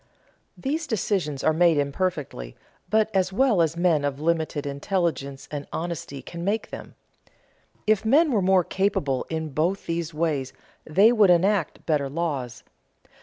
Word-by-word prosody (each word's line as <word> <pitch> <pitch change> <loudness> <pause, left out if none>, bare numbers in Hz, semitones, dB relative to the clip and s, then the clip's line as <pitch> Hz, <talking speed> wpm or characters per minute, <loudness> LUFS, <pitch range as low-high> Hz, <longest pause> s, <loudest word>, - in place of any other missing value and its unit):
These 305 +4 -2
decisions 180 - -1
are 160 - +3
made 170 -1 +4
imperfectly, 140 - -2 0.3
but 220 0 +2
as 190 0 +2
well 220 -3 +3
as 165 0 0
men 170 -4 +2
of 140 -1 -2
limited 160 -2 -1
intelligence 140 -2 -2
and 145 -1 -5
honesty 165 -5 -5
can 170 +4 -7
make 205 +4 -1
them. - - -9 0.9
If 215 0 +2
men 290 +8 +4
were 215 -5 +2
more 185 -1 +4
capable 150 -9 -1
in 160 -1 -3
both 165 +7 -1
these 165 -1 -2
ways 150 -4 -2 0.3
they 195 +8 +5
would 215 -5 +5
enact 180 0 +2
better 145 -4 0
laws. 140 -6 -3
170 Hz, 145 wpm, -25 LUFS, 145-195 Hz, 0.9 s, they